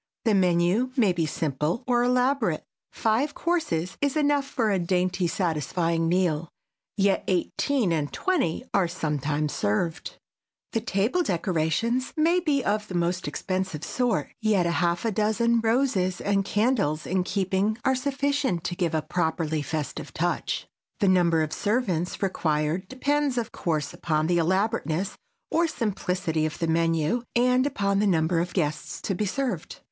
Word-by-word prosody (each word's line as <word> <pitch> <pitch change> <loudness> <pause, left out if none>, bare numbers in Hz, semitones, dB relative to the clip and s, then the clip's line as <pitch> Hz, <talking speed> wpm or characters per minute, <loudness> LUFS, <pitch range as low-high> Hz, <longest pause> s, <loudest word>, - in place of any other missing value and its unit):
The 225 - +4
menu 180 +5 +3
may 210 -7 +4
be 165 -2 0
simple 150 - -1
or 245 -1 +2
elaborate. 250 - +1 0.3
Five 235 +7 0
courses 315 - -1
is 285 +1 +1
enough 290 -2 +2
for 225 -6 0
a 195 - +2
dainty 180 +1 0
satisfying 165 0 0
meal, 170 -3 +1 0.5
yet 195 -1 +2
eighteen 195 - +1
and 150 -3 -1
twenty 280 - 0
are 190 -3 +3
sometimes 150 -3 -2
served. 160 +12 -1 0.6
The 225 - 0
table 215 - +1
decorations 185 - 0
may 335 +3 +4
be 295 -6 +1
of 210 +1 0
the 185 - -6
most 175 0 0
expensive 185 +1 -3
sort; 245 -2 -1
yet 210 -5 +2
a 170 - +1
half 170 0 0
dozen 230 +3 +2
roses 225 -6 +1
and 200 -1 +1
candles 205 - +1
in 185 +1 0
keeping 195 +3 0
are 265 - +4
sufficient 275 - 0
to 175 - -3
give 170 -3 0
a 155 - 0
properly 160 -2 -1
festive 150 0 -4
touch. - - -1 0.3
The 205 - +2
number 170 -3 +3
of 155 - -3
servants 205 -7 -1
required 160 -1 0
depends, 285 +1 0
of 230 -1 -2
course, 155 -4 -2
upon 155 -2 0
the 175 +1 +2
elaborateness 190 0 0 0.4
or 335 +1 +3
simplicity 180 - -1
of 155 - -7
the 165 - -1
menu 165 +5 +1
and 250 +2 +3
upon 200 -6 0
the 210 - +2
number 165 -2 +2
of 175 +1 -3
guests 155 -5 -2
to 195 - -1
be 205 +3 -1
served. 265 +6 -3
185 Hz, 150 wpm, -26 LUFS, 165-235 Hz, 0.6 s, The